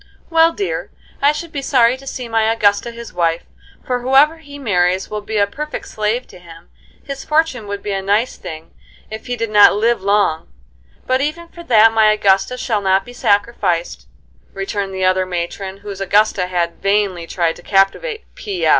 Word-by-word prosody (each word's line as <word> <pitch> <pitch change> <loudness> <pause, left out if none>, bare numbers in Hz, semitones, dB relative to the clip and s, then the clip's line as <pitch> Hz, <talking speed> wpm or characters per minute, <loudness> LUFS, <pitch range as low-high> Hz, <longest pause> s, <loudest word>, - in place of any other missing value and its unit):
"Well, 330 0 +5
dear, 175 - -3 0.3
I 285 +1 +5
should 310 +2 -6
be 280 - -4
sorry 250 -3 +3
to 275 +1 -14
see 255 -2 -5
my 225 -1 +1
Augusta 210 0 +2
his 235 0 -10
wife, 170 -1 0 0.4
for 250 -1 -1
whoever 275 +6 +3
he 285 -2 -11
marries 185 -7 0
will 210 0 -3
be 215 +1 -4
a 200 - +4
perfect 300 +8 -6
slave 215 +4 -1
to - - -14
him. 165 -1 -15 0.3
His 275 -1 -6
fortune 300 -8 0
would 200 0 -5
be 205 - -3
a 195 -1 -1
nice 205 +6 0
thing 160 0 -9 0.4
if 220 0 -8
he 245 - -2
did 230 -2 -3
not 205 -1 +7
live 230 +2 +1
long; 200 -5 +1 0.5
but 255 +1 +1
even 330 +4 -3
for 340 - -12
that 225 -4 +5
my 220 -1 +5
Augusta 200 +3 +2
shall 220 -5 -1
not 190 0 +2
be 245 - -11
sacrificed," 200 - 0 0.5
returned 195 0 -3
the 190 0 0
other 185 0 +2
matron 190 +2 -5
whose 200 -1 -6
Augusta 200 -1 +2
had 175 -2 -2
vainly 195 -4 0
tried 170 -2 -1
to - - -13
captivate 200 - +1
"P. 395 -3 -4
210 Hz, 185 wpm, -18 LUFS, 190-250 Hz, 0.5 s, not